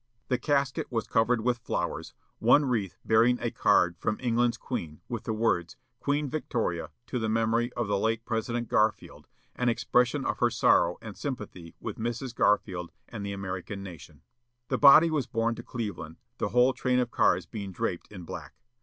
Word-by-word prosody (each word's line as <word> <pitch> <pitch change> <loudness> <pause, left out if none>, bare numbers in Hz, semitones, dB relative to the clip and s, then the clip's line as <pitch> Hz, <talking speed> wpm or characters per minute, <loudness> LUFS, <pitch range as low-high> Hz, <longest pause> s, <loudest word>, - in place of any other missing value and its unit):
The 125 - +1
casket 140 -1 0
was 115 -2 -1
covered 115 +1 +2
with 120 +1 0
flowers; - - -3 0.2
one 125 +6 +5
wreath 110 -8 -1
bearing 115 +3 +4
a 120 - -2
card 90 -1 +3
from 105 - -1
England's 120 -1 +1
queen, 85 - -5
with 115 -2 -5
the 115 - -1
words: 110 -6 0 0.2
"Queen 145 +1 0
Victoria, 110 - -2 0.2
to 125 - -3
the 110 -1 -1
memory 115 +2 +1
of 120 -3 -2
the 100 -1 +1
late 115 +2 0
President 120 +1 -2
Garfield, 110 0 0 0.3
an 125 -1 +1
expression 125 +3 +1
of - - -1
her - - +4
sorrow 85 +1 +3
and 110 -3 -8
sympathy 105 - -6
with - - -6
Mrs. 120 +2 -3
Garfield 90 -6 +1 0.2
and 105 -4 -6
the 100 - -3
American 95 0 -5
nation." 80 -5 -11 0.5
The - - 0
body 155 +4 +8
was 150 -5 0
borne 115 +1 0
to - - -7
Cleveland, 100 -9 -6 0.2
the - - 0
whole 125 +2 +4
train 125 0 0
of 125 -2 0
cars - - +2
being 100 -3 -6
draped 90 +1 -3
in 95 -4 -9
black. 85 -5 -8
115 Hz, 180 wpm, -28 LUFS, 100-125 Hz, 0.5 s, body